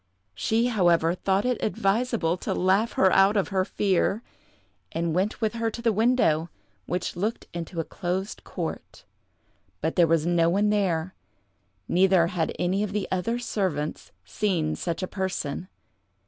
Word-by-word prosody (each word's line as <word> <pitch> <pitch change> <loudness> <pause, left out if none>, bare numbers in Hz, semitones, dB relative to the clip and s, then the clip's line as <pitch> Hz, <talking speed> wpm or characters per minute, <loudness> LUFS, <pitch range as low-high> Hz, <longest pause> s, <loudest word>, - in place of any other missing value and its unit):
She, 225 - +1
however, 175 -8 +3
thought 190 +3 0
it 250 -2 0
advisable 205 -4 +1
to - - -3
laugh 195 +5 +2
her 190 - +4
out 195 +2 +5
of 200 - +1
her 190 -2 +1
fear, 200 +3 0 0.7
and 165 0 -1
went 195 +7 -1
with 220 -1 +1
her 230 -1 -1
to 225 - -7
the 230 -1 +1
window, 210 -8 +2 0.4
which 180 +1 -2
looked 210 +6 -2
into 170 0 -5
a - - +1
closed 185 +5 -4
court, - - -6 0.7
but - - -2
there 170 -2 +6
was 165 -1 +2
no 170 -1 +3
one 205 +4 +2
there, 185 -4 0 0.7
neither 185 -1 +4
had 170 -2 -1
any 185 +3 0
of 210 -2 -2
the 210 -2 -1
other 190 +6 0
servants 185 -10 -3
seen 170 -7 -1
such 170 0 -3
a - - -1
person. 185 -4 -3
190 Hz, 155 wpm, -26 LUFS, 170-210 Hz, 0.7 s, there